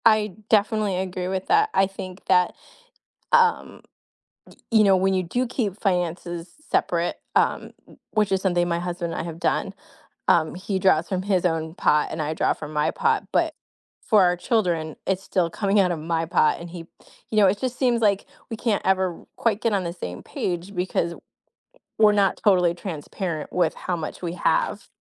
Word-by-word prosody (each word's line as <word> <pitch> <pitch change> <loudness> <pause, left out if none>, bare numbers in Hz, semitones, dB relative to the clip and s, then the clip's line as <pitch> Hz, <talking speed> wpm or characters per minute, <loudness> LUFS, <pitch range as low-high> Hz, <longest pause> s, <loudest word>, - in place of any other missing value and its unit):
I 215 -3 +4 0.2
definitely 210 -2 +2
agree 185 -1 -3
with 190 0 -3
that, 425 +3 +4
I 195 - +4
think 190 -1 -9
that, 180 -1 +3 0.8
um, 465 -2 +2 0.7
y - - -18
you 220 -2 +5
know, 195 -1 +5
when 190 +1 +2
you 185 - +1
do 245 +9 -1
keep 220 -5 -3
finances 175 -2 -2 0.2
separate, 170 0 0 0.2
um, - - +1 0.2
wh - - -22
which 210 -2 +2
is 190 0 +1
something 175 -2 +1
my 170 0 0
husband 175 -1 -3
and - - -3
I - - -7
have 165 -1 -7
done, - - 0 0.5
um, 160 -2 +3
he 190 +2 -3
draws 180 -4 +3
from 185 -2 -1
his 190 -2 +1
own 160 -2 -1
pot 150 -4 +2
and 160 - -4
I 155 +1 -2
draw - - +1
from 150 0 -8
my 150 0 +1
pot, - - 0
but - - +1 0.5
for 215 -4 +4
our 180 0 +3
children, 175 -7 0
it's 190 0 0
still 180 -3 0
coming 200 +3 +1
outta 180 -3 +2
my 165 +1 -2
pot, 170 -2 +2
and 170 - -8
he 175 0 -8 0.5
you 215 - 0
know, 205 - +7
it 195 +2 +2
just 255 -1 -3
seems 240 -3 +2
like 200 -2 +2 0.2
we 225 - -3
can't 220 -2 0
ever 190 -2 +2
r - - -20
quite 220 -3 0
get 230 - +1
on 195 -2 0
the 170 - -3
same 90 - -7
page 180 +3 -4
because 180 -2 -1
w - - -11 0.8
we're 215 -1 +6
not 200 -2 +2
totally 180 -4 +4
transparent 170 -1 -5
with 175 -3 +1
how 180 - -3
much 160 +1 -6
we 170 -2 -3
have. - - 0
185 Hz, 195 wpm, -24 LUFS, 170-205 Hz, 0.8 s, know